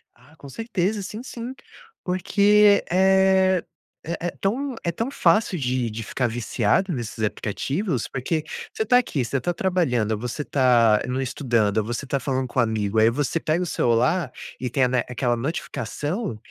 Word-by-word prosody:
Ah, 135 +6 -21
com 140 - -12
certeza 210 - -2
sim, 215 +5 -7
sim, 245 0 -6 0.5
porque, 200 +3 +4
eh, 190 0 +4 0.4
é 170 +1 -3
é - - 0
tão 255 +6 -2
é 170 - 0
tão 230 +9 -3
fácil 185 -5 +2
de 125 -3 -1
de 110 +1 -6
ficar 125 +2 -1
viciado 120 - 0
nesses 115 -5 -4
aplicativos, 135 - -2
porque 150 +4 -2 0.3
você 220 - -2
tá 245 +3 +5
aqui, 150 - 0
você 135 +3 -1
tá 175 +7 -1
trabalhando, 125 - 0
você 125 +6 -4
tá 120 -6 +4
no 130 +1 -1
estudando, 115 -5 +1
você 120 +5 -4
tá 140 +1 -1
falando 130 -1 -1
com 125 - -2
o - - +7
amigo, 110 -2 0
aí 110 +1 +6
você 145 +6 -1
pega 165 +4 0
o - - -2
celular 125 +4 +1 0.3
e 125 -1 -3
tem, 130 +1 +2
né, 125 -1 +1
a - - -10
aquela 120 -1 0
notificação 145 - -3
140 Hz, 170 wpm, -23 LUFS, 120-190 Hz, 0.5 s, o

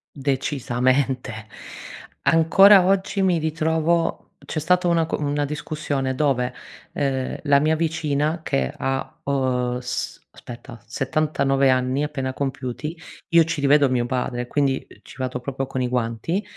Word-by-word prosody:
Decisamente. 130 -3 -1 0.8
Ancora 185 +4 +6
oggi 195 +1 +1
mi 180 -3 +3
ritrovo 160 +1 0
c'è 155 - -4
stata 180 +3 +2
una 165 -1 +2
co - - -3
una 145 0 0
discussione 145 -2 -3
dove, 130 -4 +1 0.4
ehm, 135 -2 -2
la 140 -1 +4
mia 155 +1 +2
vicina, 155 0 -1
che 65 - -1
ha, 135 0 -3
uhm, 125 -3 0
s 125 0 -4
aspetta 120 -1 -11
79 135 +1 +1
anni 130 +2 +1
appena 135 -3 -3
compiuti, 135 +3 -4 0.3
io 170 -2 +5
ci 160 -2 -3
rivedo 145 0 +4
mio 125 -2 0
padre 125 -1 -2
e 125 - -7
quindi 135 0 0 0.2
ci - - -14
vado 130 -1 -3
proprio 135 +1 -4
con 130 0 -4
i 125 - 0
guanti 125 - -1
140 Hz, 140 wpm, -23 LUFS, 130-155 Hz, 0.8 s, Ancora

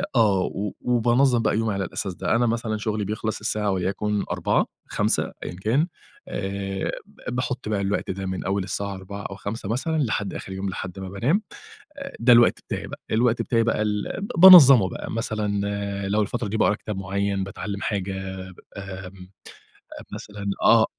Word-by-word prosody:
آه، 105 -5 +4
و 100 +2 -3
وبانظَّم 120 +1 +3
بقى 110 - +1
يومي 110 -1 0
على 100 -1 -2
الأساس 95 +2 -4
ده. 95 +4 0
أنا 120 +1 +3
مثلًا 115 -1 -1
شُغلي 105 -1 -2
بيخلص 110 +2 -3
الساعة 105 -1 -1
وليكن 100 +3 -1
16:00، - - +1 0.2
17:00 - - 0
أيًا - - -6
كان، 115 - +1 0.4
آآ، 95 0 -3
ب 125 - -8
باحط 125 -2 -3
بقى 105 -2 0
الوقت 100 0 -1
ده 95 +1 -5
من 95 0 -3
أول 95 0 0
الساعة 100 +1 -3
16:00 100 +2 -8
أو 100 - -6
17:00 100 0 -5
مثلًا، 160 +8 -1
لحد 105 -8 -1
آخر - - -7
اليوم، 95 +1 -3
لحد 95 0 -6
ما 95 -1 -6
بانام، 125 - +1 0.6
آآ، 275 0 -8
ده 120 +1 +6
الوقت 120 0 +6
بتاعي - - -3
بقى، - - -9
ده - - 0
الوقت 120 0 +2
بتاعي 115 -2 +1
بقى 115 -2 +1
ال 105 -1 -1 0.3
ب - - 0
بانظَّمه 140 - +10
بقى، - - -6
مثلًا 110 -3 -1 0.5
لو 105 +2 +2
الفترة 115 +2 -3
دي 105 - -2
باقرا 110 - +3
كتاب 105 0 -6
معيَّن، 100 0 -1
باتعلم 100 +1 -5
حاجة، 95 -2 -3
ب - - -7 0.4
آمم، 95 -1 -9 0.8
مثلًا 105 -1 -8 0.2
آه 115 -1 +6
105 Hz, 180 wpm, -24 LUFS, 95-115 Hz, 0.8 s, بانظَّمه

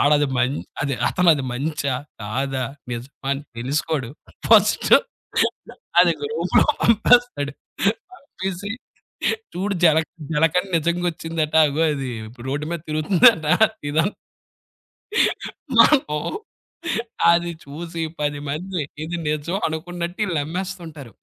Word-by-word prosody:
ఆడది 145 0 +4
మన్ 125 +3 +1 0.3
అదతనది 140 +3 +2
మంచా 140 0 -2 0.3
కాదా? 130 +4 -2 0.3
నిజమా 130 +3 -7
అని 140 +1 -4 0.2
తెలుసుకోడు. 140 +1 -1 0.4
ఫస్ట్ - - +5 1.1
అది - - +5
గ్రూప్‌లొ 450 +2 +2 0.2
పంపేస్తాడు. 230 - +3 0.6
పంపేసి 200 - -6 0.8
చూడు 195 +2 -1
జలక్ 160 0 +4 0.2
జలకని 165 +5 +2
నిజంగొచ్చిందట 165 -1 -1
అగో 150 +3 0
అది 135 -3 -3 0.2
ఇప్పుడు 120 +2 -11
రోడ్ 145 +2 -2
మీద 170 -2 -3
తిరుగుతుందంట 160 +3 +4 0.4
ఇదం 165 +5 +2 1.7
మనము 205 - +5 1.1
అది 170 0 +2
చూసి 165 +4 -6 0.2
10మంది 150 +5 -2 0.2
ఇది 170 +2 -4
నిజం 155 +5 -1
అనుకున్నట్టీళ్ళమ్మేస్తుంటారు. 170 - -4
160 Hz, 90 wpm, -22 LUFS, 145-175 Hz, 1.7 s, ఫస్ట్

